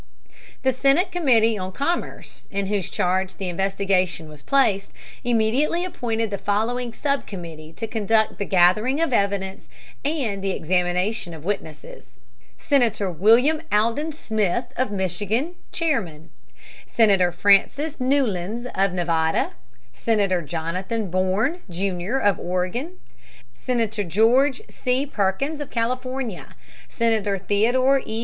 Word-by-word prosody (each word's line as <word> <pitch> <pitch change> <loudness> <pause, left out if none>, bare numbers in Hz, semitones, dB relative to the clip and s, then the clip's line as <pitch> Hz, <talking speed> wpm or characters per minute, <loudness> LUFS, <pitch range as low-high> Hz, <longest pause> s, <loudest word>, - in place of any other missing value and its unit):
The 260 0 +3
Senate 275 - +2
Committee 230 - +3
on 185 0 -4
Commerce, 335 - -3
in 200 0 -2
whose 195 -2 -1
charge 185 +1 0
the 190 -2 -4
investigation 190 -3 0
was 150 -2 -13
placed, 210 - +2 0.3
immediately 245 +9 +1
appointed 230 - -2
the 200 - -3
following 235 +4 -1
sub 280 +4 -2
committee 165 -5 -8
to 225 - -4
conduct 220 0 +1
the 200 - -1
gathering 195 - +3
of 330 -5 +1
evidence 200 -2 -1 0.3
and 255 -10 -2
the 195 - 0
examination 180 +2 0
of 155 0 -12
witnesses: 155 -9 -6 0.4
Senator 230 -8 +1
William 230 - +4
Alden 230 +9 +1
Smith 220 - -1
of 255 - 0
Michigan, 205 - -1 0.2
chairman; 175 - -2 0.6
Senator 195 -6 +3
Francis 205 - +2
Newlands 240 -5 0
of 195 -1 +1
Nevada, 165 -2 +1 0.4
Senator 200 -5 +1
Jonathan 180 +6 -3
Bourne, 190 - +1
Jr., 185 +5 -2
of 205 -7 +2
Oregon, 185 - -2 0.6
Senator 225 -4 -1
George 235 - +3
C. 255 +2 -1
Perkins 275 +6 -1
of 290 - -6
California, 255 -2 -3 0.3
Senator 220 -4 +1
Theodore 245 +8 +2
E. 220 +1 -3
210 Hz, 120 wpm, -23 LUFS, 185-255 Hz, 0.6 s, William